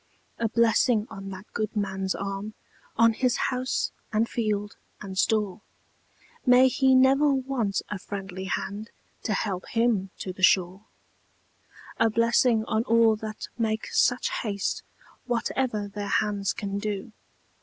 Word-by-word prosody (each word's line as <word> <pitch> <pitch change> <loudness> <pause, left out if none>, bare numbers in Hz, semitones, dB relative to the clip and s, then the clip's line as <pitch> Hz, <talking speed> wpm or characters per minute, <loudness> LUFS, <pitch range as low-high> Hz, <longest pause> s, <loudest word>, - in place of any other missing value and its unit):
A 230 -1 +1
blessing 230 -1 +3
on 195 -2 -7
that 190 +1 -8
good 215 0 -2
man's 190 -2 -1
arm, 200 +2 -5 0.4
On 230 0 +5
his 250 +1 +1
house, 255 0 -1 0.2
and 220 +1 +2
field, 210 -3 -2 0.2
and 195 -2 -7
store; 210 +1 +1 0.8
May 255 0 +6
he 265 -1 +3
never 270 +3 +5
want 260 -7 -1
a 210 - -5
friendly 190 -1 -6
hand 200 +4 -4 0.3
To 215 - -1
help 195 -2 -2
him 225 -4 +1
to 185 - -5
the 185 - -12
shore! 185 +2 +3 1.1
A 225 - +4
blessing 230 0 +3
on 220 +1 0
all 230 -1 +4
that 215 0 -6
make 220 -1 -1
such 245 0 +2
haste, 200 -3 -2 0.5
Whatever 235 -3 -1
their 205 0 -5
hands 200 -1 0
can 200 -1 -4
do! 205 0 -4
215 Hz, 135 wpm, -26 LUFS, 200-235 Hz, 1.1 s, May